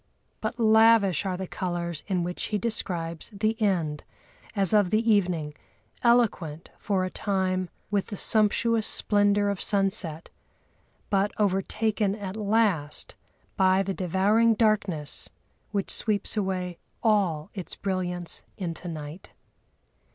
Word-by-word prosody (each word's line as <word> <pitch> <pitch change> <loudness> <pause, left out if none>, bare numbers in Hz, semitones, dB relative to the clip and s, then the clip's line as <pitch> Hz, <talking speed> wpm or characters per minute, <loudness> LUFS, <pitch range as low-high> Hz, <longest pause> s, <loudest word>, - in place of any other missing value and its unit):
But 220 +2 -3
lavish 220 -5 +5
are 185 -1 -2
the 190 - -4
colours 170 -3 -3
in 185 -3 0
which 180 +1 -4
he 210 - -1
describes 175 -7 -2
the 215 +1 -1
end, 165 -8 0 0.5
as 195 -1 +3
of 205 -4 +4
the 220 +4 +1
evening, 175 -7 +1 0.5
eloquent 205 -10 +1
for 190 -3 0
a 185 - -5
time 185 -2 -1 0.2
with 200 -2 0
the 205 - -6
sumptuous 220 +1 +2
splendour 205 0 +3
of 200 -2 -2
sunset, 195 -6 -1 0.8
but 200 +1 +2
overtaken 205 +1 0
at 200 -2 -6
last 205 -8 0 0.4
by 190 0 +3
the 195 0 -2
devouring 200 +6 +3
darkness 200 -9 0 0.4
which 200 -2 -2
sweeps 210 -2 0
away 185 -4 -2 0.2
all 190 -9 +1
its 185 -4 -6
brilliance 180 -3 -3 0.2
into 175 -2 -5
night. 155 +1 -7
195 Hz, 120 wpm, -27 LUFS, 180-215 Hz, 0.8 s, lavish